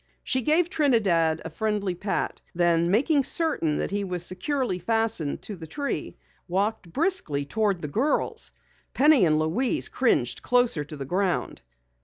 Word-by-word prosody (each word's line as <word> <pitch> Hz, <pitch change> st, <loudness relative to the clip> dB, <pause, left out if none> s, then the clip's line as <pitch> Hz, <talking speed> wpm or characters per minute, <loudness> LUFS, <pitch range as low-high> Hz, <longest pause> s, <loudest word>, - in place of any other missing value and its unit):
She 260 Hz, -, 0 dB
gave 315 Hz, +6 st, +2 dB
Trinidad 200 Hz, -, +2 dB
a 165 Hz, -, -5 dB
friendly 205 Hz, +1 st, -1 dB
pat. 195 Hz, +3 st, -3 dB
Then 170 Hz, -1 st, +2 dB
making 275 Hz, -, +3 dB
certain 255 Hz, -, +1 dB
that -, -, -2 dB
he 200 Hz, 0 st, -1 dB
was 180 Hz, -2 st, -2 dB
securely 210 Hz, +2 st, -2 dB
fastened 225 Hz, -6 st, 0 dB
to 210 Hz, -, -6 dB
the 165 Hz, -3 st, -10 dB
tree, 280 Hz, -, -4 dB, 0.3 s
walked 195 Hz, 0 st, -1 dB
briskly 275 Hz, -, 0 dB
toward 200 Hz, +1 st, -1 dB
the -, -, -2 dB
girls. 245 Hz, -, -1 dB, 0.4 s
Penny 290 Hz, -7 st, +5 dB
and 155 Hz, -2 st, +3 dB
Louise 165 Hz, +12 st, 0 dB
cringed -, -, +1 dB
closer 245 Hz, -11 st, +2 dB
to 150 Hz, +1 st, -9 dB
the 135 Hz, -, -5 dB
ground. 185 Hz, +5 st, -1 dB
200 Hz, 150 wpm, -26 LUFS, 165-255 Hz, 0.4 s, Penny